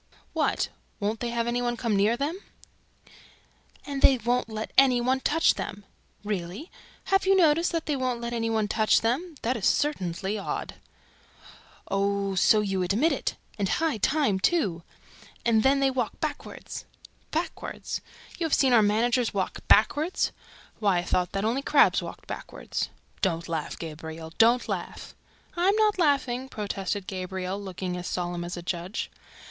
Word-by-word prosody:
"What? -, -, +1 dB, 0.3 s
WON'T 210 Hz, +1 st, -1 dB
THEY 240 Hz, -, -2 dB
HAVE 235 Hz, 0 st, -1 dB
ANY 240 Hz, +1 st, 0 dB
ONE 240 Hz, -1 st, -1 dB
COME 230 Hz, -3 st, 0 dB
NEAR 210 Hz, +4 st, +3 dB
THEM?" 300 Hz, +7 st, -2 dB, 1.5 s
"AND 280 Hz, -1 st, -4 dB
THEY 265 Hz, -, +7 dB
WON'T 240 Hz, +1 st, 0 dB
LET 220 Hz, 0 st, -5 dB
ANY 260 Hz, -2 st, +6 dB
ONE 255 Hz, +2 st, +1 dB
TOUCH 325 Hz, +5 st, +3 dB
THEM!" 200 Hz, 0 st, -6 dB, 0.4 s
"Really? 205 Hz, -, -4 dB, 0.4 s
Have 385 Hz, 0 st, +3 dB
you 390 Hz, -, +6 dB
noticed 335 Hz, -1 st, +4 dB
THAT 330 Hz, -2 st, -2 dB
THEY 295 Hz, -, 0 dB
WON'T 255 Hz, -2 st, -1 dB
LET 235 Hz, 0 st, -4 dB
ANY 225 Hz, -1 st, -1 dB
ONE 220 Hz, -2 st, +1 dB
TOUCH 215 Hz, +1 st, +3 dB
THEM? 295 Hz, +9 st, -1 dB
That 245 Hz, +3 st, +1 dB
is 215 Hz, -, 0 dB
certainly 195 Hz, -, 0 dB
odd!" 195 Hz, -, -4 dB, 1.1 s
"Oh, 200 Hz, 0 st, 0 dB
so 210 Hz, +3 st, +4 dB
you 195 Hz, -2 st, -1 dB
admit 210 Hz, -, +2 dB
it! -, -, -2 dB, 0.2 s
And 195 Hz, -2 st, 0 dB
high 320 Hz, -6 st, +1 dB
time, 240 Hz, -3 st, +2 dB
too! 195 Hz, -, +1 dB, 0.6 s
And 225 Hz, -2 st, +4 dB
THEN, 275 Hz, +3 st, +3 dB
THEY 270 Hz, -1 st, +3 dB
WALK 250 Hz, -4 st, -2 dB
BACKWARD!" -, -, -5 dB, 0.7 s
"BACKWARD! 325 Hz, +3 st, -4 dB, 0.6 s
You 330 Hz, -, +1 dB
have 310 Hz, -, +3 dB
seen 265 Hz, -3 st, +3 dB
our 230 Hz, -, +7 dB
managers 230 Hz, +3 st, +2 dB
WALK 190 Hz, -2 st, -1 dB
BACKWARD? 295 Hz, -, +3 dB, 0.5 s
Why, 200 Hz, -4 st, +3 dB
I 175 Hz, -, 0 dB
thought 180 Hz, 0 st, 0 dB
that 195 Hz, +1 st, -1 dB
only 240 Hz, +5 st, +1 dB
crabs 285 Hz, +1 st, +4 dB
walked -, -, -8 dB
backward!" -, -, -8 dB, 0.5 s
"Don't 170 Hz, -4 st, 0 dB
laugh, 160 Hz, -3 st, -3 dB
Gabriel; 160 Hz, 0 st, -7 dB
don't 235 Hz, +2 st, +5 dB
laugh!" -, -, -5 dB, 0.4 s
"I'm 370 Hz, +4 st, +3 dB
not 425 Hz, -2 st, +2 dB
laughing," 265 Hz, -5 st, +1 dB
protested 200 Hz, -2 st, -3 dB
Gabriel, 185 Hz, +1 st, -4 dB
looking 185 Hz, -2 st, -4 dB
as 180 Hz, -, -5 dB
solemn 175 Hz, -1 st, -2 dB
as 175 Hz, +1 st, -5 dB
a 175 Hz, -, -6 dB
judge. 175 Hz, +3 st, -3 dB
225 Hz, 160 wpm, -27 LUFS, 195-270 Hz, 1.5 s, THEY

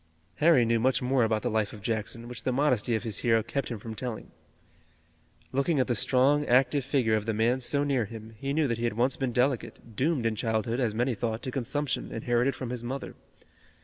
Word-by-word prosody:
Harry 150 Hz, -6 st, +5 dB
knew 115 Hz, 0 st, +2 dB
much 130 Hz, +3 st, +2 dB
more 130 Hz, 0 st, +2 dB
about 110 Hz, -1 st, 0 dB
the -, -, 0 dB
life 110 Hz, -2 st, 0 dB
of 105 Hz, -, -10 dB
Jackson, 115 Hz, +1 st, -3 dB
which 120 Hz, -2 st, -4 dB
the 130 Hz, -, 0 dB
modesty 125 Hz, -4 st, +1 dB
of 110 Hz, -, -2 dB
his 110 Hz, -3 st, -2 dB
hero 115 Hz, -2 st, +2 dB
kept 140 Hz, +4 st, -3 dB
him 115 Hz, -, -4 dB
from 110 Hz, +2 st, -7 dB
telling. 120 Hz, 0 st, -6 dB, 1.2 s
Looking 140 Hz, +3 st, +1 dB
at 130 Hz, -, +3 dB
the 120 Hz, -, 0 dB
strong, 135 Hz, +6 st, +3 dB
active 130 Hz, +3 st, +3 dB
figure 130 Hz, -4 st, +1 dB
of 110 Hz, 0 st, 0 dB
the 110 Hz, -, 0 dB
man 120 Hz, +4 st, +2 dB
so 140 Hz, +3 st, +1 dB
near 135 Hz, -5 st, +1 dB
him 110 Hz, +1 st, -10 dB
he 140 Hz, -, -3 dB
knew 150 Hz, 0 st, +2 dB
that 115 Hz, -2 st, -2 dB
he 120 Hz, -, -1 dB
had 115 Hz, -2 st, -2 dB
once 125 Hz, +3 st, +2 dB
been 130 Hz, -2 st, -2 dB
delicate, 125 Hz, -2 st, -1 dB
doomed 135 Hz, 0 st, 0 dB
in 115 Hz, -1 st, +1 dB
childhood, 110 Hz, +2 st, -1 dB
as 115 Hz, -5 st, 0 dB
many 125 Hz, +3 st, +1 dB
thought, 115 Hz, 0 st, -3 dB
to 130 Hz, -, -3 dB
consumption, 135 Hz, +2 st, -2 dB
inherited 120 Hz, +3 st, 0 dB
from 125 Hz, -2 st, -5 dB
his 125 Hz, -2 st, -3 dB
mother. 130 Hz, +3 st, -5 dB
120 Hz, 220 wpm, -28 LUFS, 115-135 Hz, 1.2 s, Harry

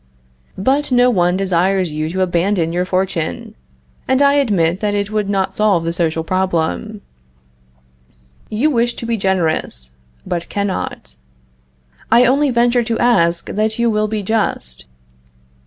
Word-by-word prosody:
But 270 Hz, +8 st, 0 dB
no 250 Hz, 0 st, +4 dB
one 180 Hz, -3 st, +2 dB
desires 185 Hz, -1 st, +1 dB
you 155 Hz, +1 st, -3 dB
to 190 Hz, +3 st, -2 dB
abandon 175 Hz, -1 st, 0 dB
your 180 Hz, +1 st, 0 dB
fortune, 185 Hz, -, -2 dB, 0.5 s
and 260 Hz, 0 st, +2 dB
I 280 Hz, 0 st, +4 dB
admit 195 Hz, -, +1 dB
that 205 Hz, -1 st, -1 dB
it 205 Hz, 0 st, -2 dB
would 210 Hz, -2 st, -1 dB
not 195 Hz, -1 st, 0 dB
solve 200 Hz, -5 st, +2 dB
the 165 Hz, 0 st, -2 dB
social 165 Hz, -2 st, -1 dB
problem. 185 Hz, +4 st, -2 dB, 1.5 s
You 250 Hz, +9 st, +1 dB
wish 240 Hz, -2 st, +1 dB
to -, -, -6 dB
be 230 Hz, 0 st, 0 dB
generous, 165 Hz, -, -1 dB, 0.3 s
but 170 Hz, -1 st, -4 dB
cannot. 185 Hz, -, -4 dB, 0.9 s
I 240 Hz, +2 st, +6 dB
only 275 Hz, +3 st, +3 dB
venture 240 Hz, 0 st, +2 dB
to 225 Hz, 0 st, -2 dB
ask 170 Hz, -8 st, +2 dB
that 215 Hz, +1 st, -1 dB
you 235 Hz, -1 st, +2 dB
will 215 Hz, 0 st, +1 dB
be 215 Hz, -1 st, -3 dB
just. 190 Hz, -, -2 dB
195 Hz, 140 wpm, -17 LUFS, 170-230 Hz, 1.5 s, I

